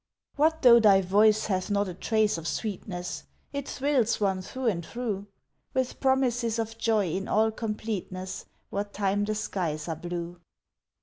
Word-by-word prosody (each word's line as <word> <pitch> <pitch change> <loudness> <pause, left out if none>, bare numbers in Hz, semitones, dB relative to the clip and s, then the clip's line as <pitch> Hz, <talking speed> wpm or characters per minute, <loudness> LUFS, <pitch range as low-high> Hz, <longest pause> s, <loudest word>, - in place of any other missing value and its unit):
What 320 +2 +2
though 235 -2 +9
thy 200 -3 +6
voice 210 +3 +4
hath 185 -2 -1
not 205 0 +1
a 180 - -5
trace 215 0 +1
of 165 - -6
sweetness 180 0 -4 0.3
It 280 -1 -4
thrills 265 -5 +1
one 190 -2 +1
through 260 +7 -6
and 185 -7 +1
through, 205 -1 -4 0.5
With 260 -1 -1
promises 245 -4 +1
of 225 0 -3
Joy 215 -6 +2
in 195 +4 -3
all 220 +1 +3
completeness 210 -4 -4 0.3
What 200 0 -3
time 205 0 0
the 215 +1 -1
skies 165 -7 -3
are 165 - -2
blue. 175 +1 -5
210 Hz, 160 wpm, -27 LUFS, 185-230 Hz, 0.5 s, though